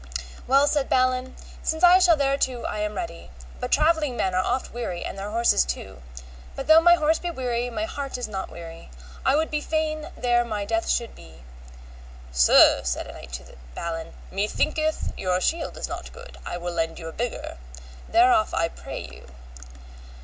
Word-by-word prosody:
Well, 275 Hz, +2 st, +5 dB
said 290 Hz, -2 st, 0 dB
Balin, 255 Hz, 0 st, +1 dB, 0.3 s
since 320 Hz, +2 st, -2 dB
I 355 Hz, +1 st, +8 dB
shall 350 Hz, -3 st, +5 dB
thereto 275 Hz, -3 st, 0 dB
I 210 Hz, -, -3 dB
am 210 Hz, 0 st, -2 dB
ready, 345 Hz, -, -6 dB, 0.3 s
but 250 Hz, -, -4 dB
travelling 305 Hz, -5 st, +2 dB
men 190 Hz, -, 0 dB
are 185 Hz, 0 st, +2 dB
oft 255 Hz, +5 st, -2 dB
weary 210 Hz, -8 st, -4 dB
and -, -, -5 dB
their 195 Hz, +1 st, -5 dB
horses 230 Hz, -, +3 dB
too, 65 Hz, 0 st, -6 dB, 0.5 s
but 270 Hz, -, -5 dB
though 315 Hz, +1 st, +7 dB
my 345 Hz, +1 st, +7 dB
horse 315 Hz, -1 st, +2 dB
be 350 Hz, -, -3 dB
weary 245 Hz, -5 st, -2 dB
my 215 Hz, -2 st, -3 dB
heart 275 Hz, +3 st, -5 dB
is 250 Hz, -, -4 dB
not 195 Hz, -3 st, -5 dB
weary, 165 Hz, -1 st, -10 dB, 0.3 s
I -, -, +3 dB
would 315 Hz, +2 st, 0 dB
be 300 Hz, -1 st, -1 dB
fain 310 Hz, 0 st, -2 dB
there 240 Hz, -1 st, +2 dB
my 210 Hz, -3 st, -3 dB
death 335 Hz, +9 st, -1 dB
should 235 Hz, -1 st, 0 dB
be. 80 Hz, -7 st, -15 dB, 0.9 s
Sir, -, -, +6 dB
said 65 Hz, -1 st, -2 dB
a -, -, -9 dB
knight -, -, -11 dB
to 65 Hz, 0 st, -8 dB, 0.2 s
Balin, 165 Hz, -1 st, -5 dB, 0.2 s
methinketh 310 Hz, +10 st, -1 dB
your 185 Hz, -1 st, +1 dB
shield 325 Hz, -, -1 dB
is -, -, -4 dB
not -, -, -7 dB
good, 485 Hz, +1 st, -12 dB
I -, -, -3 dB
will 175 Hz, 0 st, -4 dB
lend 165 Hz, -1 st, -2 dB
you 165 Hz, -, -7 dB
a -, -, -5 dB
bigger. 240 Hz, -, -4 dB, 0.5 s
Thereof 350 Hz, -1 st, +4 dB
I 165 Hz, 0 st, +1 dB
pray -, -, -8 dB
you. -, -, -12 dB
245 Hz, 185 wpm, -25 LUFS, 185-310 Hz, 0.9 s, I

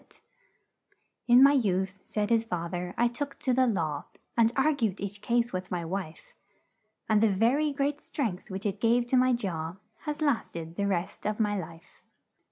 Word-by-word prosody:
"'In 245 Hz, +2 st, +8 dB
my 280 Hz, -, +8 dB
youth,' 190 Hz, -6 st, 0 dB
said 210 Hz, +1 st, -2 dB
his 225 Hz, -1 st, +4 dB
fath 170 Hz, -5 st, -4 dB
er, 180 Hz, 0 st, -4 dB
'I 240 Hz, -, +4 dB
took 280 Hz, +4 st, -5 dB
to 255 Hz, -, 0 dB
the 255 Hz, +1 st, +4 dB
law 160 Hz, -9 st, -1 dB, 0.3 s
And 230 Hz, -1 st, +4 dB
ar 305 Hz, +3 st, +3 dB
gued 220 Hz, -8 st, -1 dB
each 200 Hz, +1 st, -5 dB
case 235 Hz, 0 st, +1 dB
with 185 Hz, 0 st, -4 dB
my 175 Hz, -2 st, -3 dB
wife; 170 Hz, -2 st, -6 dB, 0.7 s
And 215 Hz, -1 st, +3 dB
the 225 Hz, -, +5 dB
ver 225 Hz, +8 st, +3 dB
y 305 Hz, -1 st, +1 dB
great 285 Hz, +1 st, -1 dB
strength, 220 Hz, -11 st, -3 dB
which 190 Hz, +2 st, -5 dB
it 205 Hz, 0 st, -2 dB
gave 235 Hz, +1 st, +3 dB
to 260 Hz, -, +2 dB
my 255 Hz, 0 st, +4 dB
jaw, 175 Hz, -7 st, -3 dB, 0.3 s
Has 300 Hz, -1 st, -3 dB
last 285 Hz, -, 0 dB
ed 165 Hz, 0 st, -6 dB
the 200 Hz, +1 st, 0 dB
rest 180 Hz, 0 st, -2 dB
of 210 Hz, +1 st, -2 dB
my 210 Hz, -2 st, +1 dB
life.' 170 Hz, -2 st, -8 dB
210 Hz, 190 wpm, -28 LUFS, 185-245 Hz, 0.7 s, In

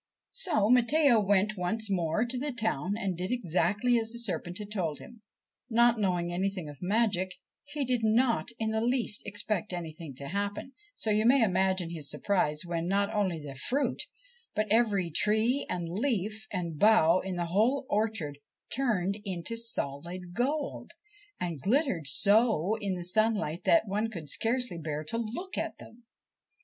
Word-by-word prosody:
So 310 Hz, -, +1 dB
Matteo 250 Hz, +1 st, +5 dB
went 205 Hz, +1 st, +2 dB
once 215 Hz, +5 st, -1 dB
more 175 Hz, +4 st, +1 dB
to 245 Hz, +1 st, -3 dB
the 290 Hz, +2 st, -1 dB
town 210 Hz, -, -1 dB
and 195 Hz, -5 st, -2 dB
did 180 Hz, +2 st, -3 dB
exactly 235 Hz, +2 st, +1 dB
as 225 Hz, 0 st, -3 dB
the 235 Hz, -, -7 dB
serpent 180 Hz, -6 st, -4 dB
had 210 Hz, -1 st, -7 dB
told 170 Hz, -8 st, -2 dB
him. 235 Hz, -2 st, -13 dB, 0.5 s
Not 235 Hz, 0 st, +4 dB
knowing 175 Hz, -3 st, 0 dB
anything 185 Hz, -2 st, -2 dB
of 145 Hz, -2 st, -10 dB
magic, 190 Hz, -2 st, +1 dB, 0.3 s
he 290 Hz, -1 st, -3 dB
did 250 Hz, -2 st, 0 dB
not 230 Hz, +2 st, +2 dB
in 220 Hz, -1 st, -1 dB
the 220 Hz, 0 st, 0 dB
least 240 Hz, -3 st, 0 dB
expect 205 Hz, +1 st, -2 dB
anything 165 Hz, -4 st, -6 dB
to 140 Hz, +2 st, -7 dB
happen; 205 Hz, +6 st, -3 dB, 0.2 s
so 220 Hz, -, -2 dB
you 210 Hz, +1 st, +3 dB
may 260 Hz, 0 st, +6 dB
imagine 185 Hz, -3 st, +1 dB
his 155 Hz, -4 st, -6 dB
surprise 150 Hz, -2 st, 0 dB
when 170 Hz, -1 st, -2 dB
not 200 Hz, +3 st, +1 dB
only 195 Hz, -5 st, +1 dB
the 145 Hz, -2 st, -8 dB
fruit, 250 Hz, -, -1 dB, 0.5 s
but 215 Hz, -, +1 dB
every 205 Hz, -6 st, +2 dB
tree 220 Hz, -, +2 dB
and 175 Hz, -2 st, -2 dB
leaf 215 Hz, +2 st, -2 dB
and 170 Hz, -5 st, -3 dB
bough 185 Hz, -5 st, +6 dB
in 190 Hz, -1 st, -4 dB
the 175 Hz, -1 st, -1 dB
whole 250 Hz, +8 st, +2 dB
orchard, 205 Hz, -10 st, -1 dB, 0.4 s
turned 210 Hz, -7 st, 0 dB
into 190 Hz, +2 st, -3 dB
solid 175 Hz, -5 st, -4 dB
gold, 280 Hz, +7 st, -2 dB, 0.5 s
and 170 Hz, -6 st, -3 dB
glittered 215 Hz, -, +1 dB
so 210 Hz, -, +4 dB
in 195 Hz, -2 st, -1 dB
the 175 Hz, -, -5 dB
sunlight 205 Hz, -4 st, +1 dB
that 330 Hz, -9 st, +4 dB
one 210 Hz, +3 st, -1 dB
could 165 Hz, -9 st, -5 dB
scarcely 230 Hz, -6 st, 0 dB
bear 155 Hz, -1 st, -3 dB
to 155 Hz, +9 st, -2 dB
look 295 Hz, -, -4 dB
at -, -, -3 dB
them. 235 Hz, +1 st, -15 dB
205 Hz, 165 wpm, -29 LUFS, 175-230 Hz, 0.5 s, may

